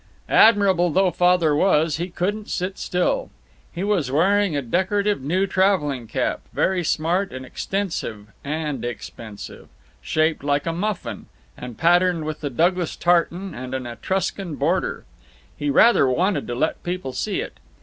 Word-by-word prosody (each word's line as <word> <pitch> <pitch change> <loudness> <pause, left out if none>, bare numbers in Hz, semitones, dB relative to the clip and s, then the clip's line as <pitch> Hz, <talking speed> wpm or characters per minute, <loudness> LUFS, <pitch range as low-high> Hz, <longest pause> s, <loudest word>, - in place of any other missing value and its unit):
Admirable 195 -5 +5
though 185 +3 +2
Father 175 -4 +3
was, 155 -2 +2
he 175 +3 -3
couldn't 205 +5 -3
sit 185 +1 -3
still. 180 0 0 0.4
He 175 - -4
was 195 -10 0
wearing 185 +3 +2
a 140 - -2
decorative 200 - 0
new 180 +8 +1
traveling 160 - +1
cap, - - -1
very 185 -2 +1
smart 170 +5 0
and 130 0 -7
extensive 165 - -4 0.2
and 150 -3 -3
expensive, 115 -2 -8 0.3
shaped 155 -2 0
like 145 0 0
a 165 - -1
muffin, 200 +3 -4 0.3
and 125 -2 -9
patterned 175 -1 +3
with 155 0 -5
the 145 - -2
Douglas 175 +5 +1
tartan 175 +2 +1
and 130 +1 -6
an 130 -1 -4
Etruscan 180 - -3
border. - - -1 0.5
He 145 -1 -2
rather 220 - +5
wanted 185 +9 0
to 120 - -3
let 155 +6 -1
people 175 -7 -4
see 200 +11 -2
it. - - -6
170 Hz, 150 wpm, -22 LUFS, 145-190 Hz, 0.5 s, Admirable